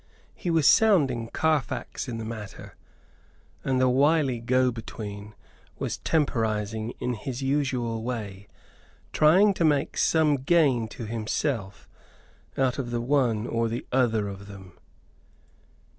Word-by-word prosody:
He 175 - -5
was 160 -4 +3
sounding 145 - +4
Carfax 155 0 -1
in 115 - -4
the 115 - -5
matter, 105 -4 -8 0.9
and 130 -1 0
the 130 - +4
wily 135 0 +2
go 125 +2 +2
between 105 -2 -8 0.4
was - - -3
temporizing 110 -6 -1
in 125 - -2
his 125 +4 -5
usual 130 -5 -1
way 105 -5 -5 0.7
trying 190 +7 +5
to 175 - -1
make 145 -3 +1
some 155 -3 +3
gain 135 -5 +2
to 115 +1 -8
himself 110 -1 -3 0.7
out 130 0 +1
of 120 -3 -4
one 120 -2 +1
or 115 -1 0
the 115 +2 -4
other 115 -5 +2
of 100 0 -8
them. 95 -3 -12
120 Hz, 125 wpm, -26 LUFS, 110-140 Hz, 0.9 s, trying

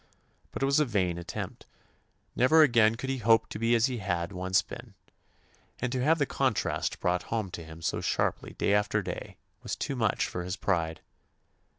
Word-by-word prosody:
But - - -4
it - - +4
was 140 +2 +3
a 150 - +3
vain 95 -8 0
attempt. 85 - -6 0.7
Never 155 +6 +6
again 115 -5 +4
could 135 +3 -4
he 135 - -2
hope 115 0 +4
to - - -6
be 115 +1 +3
as 115 0 +4
he 125 -3 -2
had 90 -2 -2
once 95 0 +1
been, - - -10 0.8
and 125 0 -2
to 125 -1 -1
have 160 +4 +4
the 145 - +2
contrast 130 -5 -1
brought 90 0 +1
home 110 -5 -2
to 85 - -7
him 80 +1 -11
so - - -1
sharply - - -1
day 100 - +1
after 105 -1 +1
day - - -6 0.2
was - - -4
too 140 - -3
much 110 -5 +1
for 90 - -4
his 90 +1 -3
pride. 80 -5 -1
110 Hz, 195 wpm, -29 LUFS, 90-125 Hz, 0.8 s, Never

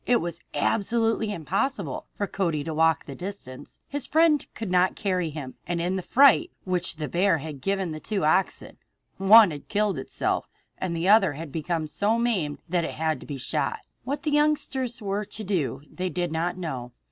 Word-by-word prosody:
It 240 -1 +4
was 170 0 -4 0.2
absolutely 225 +5 +1
impossible 170 - -2
for 205 - -1
Cody 170 -7 -1
to 160 - -4
walk 160 0 +2
that 140 - -9
distance. 180 -9 -7
His 285 -1 -3
friend 315 -1 +4
could 220 -5 -4
not 180 0 +3
carry 185 -4 -1
him, 145 -4 -7
and 175 0 -1
in 175 +2 0
the 190 - -1
fright 280 - +5
which 180 -2 -1
the 155 -2 -4
bear 175 +4 +2
had 150 -2 -7
given 195 -1 -1
the 155 - -5
two 195 -1 -1
oxen 185 +5 +1 0.4
one 205 0 +8
had 145 -2 -8
killed 205 -6 0
itself, - - -2 0.3
and 170 -3 -2
the 170 +3 -1
other 200 -5 +6
had 155 +1 -7
become 160 +2 -2
so 205 +9 0
maimed 200 -12 -1
that 175 0 0
it - - -4
had 160 -1 0
to - - -12
be 145 - -5
shot. 130 - -1 0.3
What 280 +2 -3
the 300 - 0
youngsters 285 -5 +1
were 200 +1 -1
to 215 +1 -7
do 160 -8 -1
they 185 0 -4
did 175 0 -2
not 170 +3 -1
know. 130 -9 -5
180 Hz, 195 wpm, -26 LUFS, 160-215 Hz, 0.4 s, one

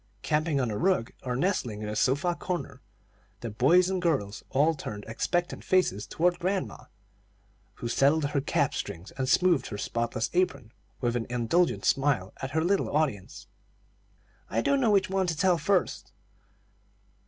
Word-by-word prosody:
Camping 155 -1 +1
on 125 -3 0
the 105 - -3
rug, 185 -11 +1
or 125 -1 -3
nestling 125 - -1
in - - -4
the 105 - -4
sofa 145 - +2
corner, 170 -7 -5 0.6
the 115 - -5
boys 160 - +4
and 190 -1 -1
girls 135 - -1
all 150 +5 +3
turned 105 -8 -7
expectant 175 +10 -2
faces 180 - +1
toward 175 +2 +1
grandma, 185 - -2 0.9
who - - -5
settled 140 +5 +3
her 140 - +1
cap 140 - 0
strings 85 +5 -6
and 130 -1 -3
smoothed 180 -2 +3
her 105 - -6
spotless 115 +1 -2
apron, 140 -11 0 0.3
with 120 -1 0
an 115 -2 -2
indulgent 125 +9 +1
smile 135 -9 +1
at 135 - -3
her 160 +3 0
little 195 +3 +1
audience. 135 -12 -2 1.0
"I 115 - 0
don't 280 - +2
know 235 - +3
which 200 -2 +3
one 190 -1 +1
to 165 -3 -2
tell 180 0 +3
first." 195 0 0
145 Hz, 160 wpm, -28 LUFS, 115-180 Hz, 1.0 s, boys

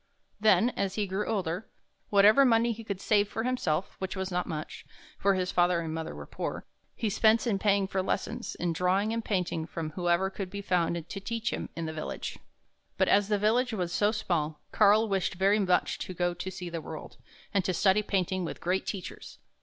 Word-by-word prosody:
Then, 220 +3 +4
as 195 -3 -2
he 210 - 0
grew 195 +2 -2
older, 190 -2 -2 0.4
whatever 210 +6 +6
money 235 -2 +4
he 225 0 -6
could 200 -3 -4
save 205 0 +3
for 225 +2 -3
himself 195 -9 -1
— - - -40
which 190 0 -3
was 190 0 -3
not 180 0 -1
much, 155 -2 -5 0.4
for 200 0 +3
his 185 -1 -1
father 175 -1 +3
and 160 -1 -4
mother 160 0 -4
were - - -8
poor - - -5 0.2
— - - -42
he 225 - -2
spent 220 +3 +3
in 210 -5 +1
paying 200 -1 +3
for 190 0 -1
lessons 185 - -3
in 175 -1 -1
drawing 190 +5 +1
and 230 0 -2
painting 180 -6 -1
from 160 -1 -5
whoever 175 +3 +1
could 195 -2 -5
be 200 +1 -6
found 175 -3 +1
to 195 - -6
teach 230 +3 -2
him - - -4
in 165 - -3
the 160 - -4
village. 155 - -5 0.6
But - - +3
as 200 -1 +4
the 210 -1 +2
village 230 +4 +2
was 180 -4 -2
so 205 +3 +3
small, 165 -8 -1
Karl 215 +1 +5
wished 195 -2 0
very 195 +3 +3
much 185 -3 +1
to 185 - -5
go 175 0 0
to 180 +2 -5
see 185 -1 -7
the 165 -1 -4
world, 155 0 -8 0.4
and 200 -2 +2
to 185 - 0
study 190 +3 +3
painting 185 -2 -1
with 170 - -5
great 185 +2 -1
teachers. 190 -4 -6
190 Hz, 215 wpm, -29 LUFS, 175-210 Hz, 0.6 s, whatever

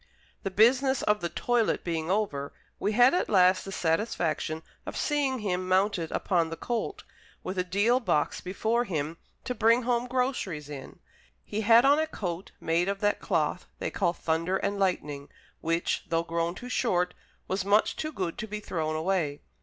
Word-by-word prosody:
The 195 - -2
business 255 +7 +4
of 210 -1 +2
the 170 - -1
toilet 240 +2 +1
being 165 -1 -2
over, 180 -9 -1 0.3
we 210 - 0
had 245 +4 +6
at 360 - +1
last 185 -2 +5
the 195 - -6
satisfaction 165 -3 -1 0.2
of - - -6
seeing 285 -3 +1
him 185 -4 -2
mounted 185 -3 +1
upon 170 -4 +1
the 165 - -4
colt, 395 - -3 0.4
with 185 0 -3
a - - +2
deal 205 +7 +2
box 150 - 0
before 220 +6 0
him 160 -3 -3 0.3
to 250 - -2
bring 230 +1 +3
home 240 0 0
groceries 250 - -2
in. 140 -3 -8 0.5
He 215 +1 -3
had 230 +3 +6
on 285 +2 +5
a 315 - +1
coat 180 - -5
made 170 +3 +1
of 200 0 -2
that 205 0 +2
cloth 165 -2 -1
they - - -3
call 175 -3 +1
thunder 165 +2 -1
and 200 +1 -2
lightning, 150 -7 -1 0.3
which, 165 +1 -1
though 165 0 +1
grown 170 +1 -1
too 250 - -8
short, 180 -8 +1 0.3
was 190 0 -1
much 205 +2 +3
too 310 - -3
good 185 - -4
to 220 - -4
be 210 0 -4
thrown 160 -6 -2
away. 160 -3 -1
190 Hz, 175 wpm, -28 LUFS, 165-230 Hz, 0.5 s, had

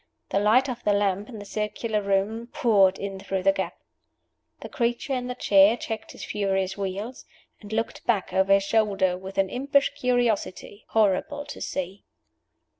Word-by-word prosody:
The 195 - +2
light 225 +6 +4
of 245 -2 -5
the 205 - +3
lamp 200 +1 0
in 230 - -8
the 205 - -8
circular 210 +1 -2
room 200 +4 0
poured 205 -9 +3
in 195 -1 -5
through 190 -1 -3
the 195 - +5
gap. 195 0 -4 0.8
The - - -6
creature 240 +2 -1
in 250 -1 -2
the 250 - -4
chair 200 0 +5
checked 220 -2 -6
his - - -8
furious 195 -2 -1
wheels, 200 +5 -5 0.4
and 205 -1 -11
looked 225 +1 -3
back 210 -6 0
over 190 +1 +4
his 195 0 +4
shoulder 195 -3 +2
with 190 +1 -9
an 195 -1 +1
impish 280 +2 +2
curiosity 240 -6 -1
horrible 220 +7 +1
to 290 - -9
see. 185 +2 -4
205 Hz, 170 wpm, -25 LUFS, 195-235 Hz, 0.8 s, the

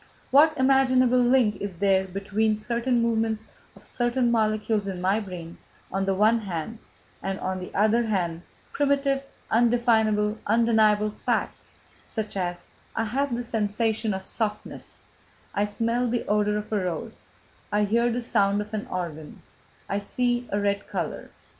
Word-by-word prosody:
What 305 +4 +6
imaginable 260 -1 +4
link 245 -3 +3
is 200 -4 -5
there 190 0 +3
between 200 +3 0
certain 235 +2 0
movements 225 -1 0 0.3
of - - -17
certain 240 0 0
molecules 215 -2 +1
in 190 -2 -4
my 190 +4 +2
brain, 180 -5 -8 0.3
on 195 +1 -1
the 195 0 +1
one 215 +4 +4
hand, 200 +2 -5 0.4
and 195 0 -3
on 185 0 -3
the 180 - -7
other 215 +3 +3
hand 175 -5 -1 0.3
primitive, 275 -1 +1 0.3
undefinable, 220 -3 +2
undeniable 215 -1 +3
facts - - -3 0.3
such 215 -2 -5
as: 175 -2 -3 0.3
I 225 - +1
have 255 +3 -1
the 245 - -3
sensation 220 -1 0
of 190 0 -7
softness, 210 -2 -5 0.5
I 205 - +1
smell 230 +3 0
the 240 0 -1
odour 210 0 +2
of 210 +1 -5
a 205 -3 +1
rose, 185 +6 -5 0.4
I 210 0 +2
hear 235 +3 +2
the 240 +1 -2
sound 205 -3 +2
of 210 +1 -9
an 215 -1 -3
organ, 160 -4 -6 0.4
I 200 - -1
see 245 +3 -1
a 200 - +1
red 200 0 -1
colour, 185 -6 -4
&c...." - - -29
215 Hz, 155 wpm, -26 LUFS, 200-235 Hz, 0.5 s, What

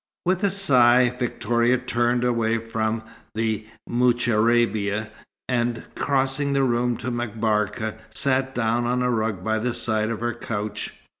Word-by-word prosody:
With 185 +2 +1
a 200 - +4
sigh, 125 -10 +5
Victoria 120 0 +1
turned 120 -1 0
away 115 -2 +1
from 110 0 -2 0.3
the 110 -1 -1 0.2
moucharabia, 115 -3 +2 0.4
and 120 -2 -1
crossing 140 +1 0
the 135 -1 +2
room 120 -1 +1
to 125 - -4
M'Barka, 110 -2 -1
sat 130 -1 0
down 120 0 +1
on 125 +1 +1
a 125 - +1
rug 110 -5 -1
by 110 +1 0
the 120 +2 -2
side 110 -2 0
of 115 - -3
her 120 0 -1
couch. 105 -2 -4
120 Hz, 140 wpm, -24 LUFS, 110-125 Hz, 0.4 s, sigh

